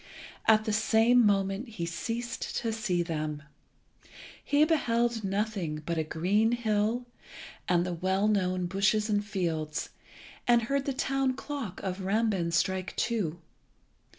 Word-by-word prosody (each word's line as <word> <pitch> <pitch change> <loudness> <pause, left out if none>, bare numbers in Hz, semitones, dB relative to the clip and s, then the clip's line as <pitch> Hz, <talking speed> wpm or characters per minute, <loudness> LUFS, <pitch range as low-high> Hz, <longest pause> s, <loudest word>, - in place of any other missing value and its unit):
At 215 -1 +5
the 215 - 0
same 225 +3 +4
moment 195 +2 +1
he 210 -7 -5
ceased 230 +8 -4
to 230 -2 -1
see 200 -6 0
them. 155 -3 -3 1.0
He 290 +1 +4
beheld 240 -7 +1
nothing 195 -6 -2
but 170 0 -1
a - - +1
green 195 +9 +1
hill, 225 +1 0 0.6
and 175 -1 +3
the 180 - -2
well 190 +4 +1
known 185 -3 +1
bushes 200 +4 +1
and 205 0 +2
fields, 165 -7 -2 0.6
and 240 -1 +5
heard 275 +4 -1
the 275 - -1
town 270 0 0
clock 270 -8 -5
of 190 0 -3
Rambin 195 -3 +1
strike 185 +3 0
two. 200 -9 -1
205 Hz, 135 wpm, -29 LUFS, 180-230 Hz, 1.0 s, At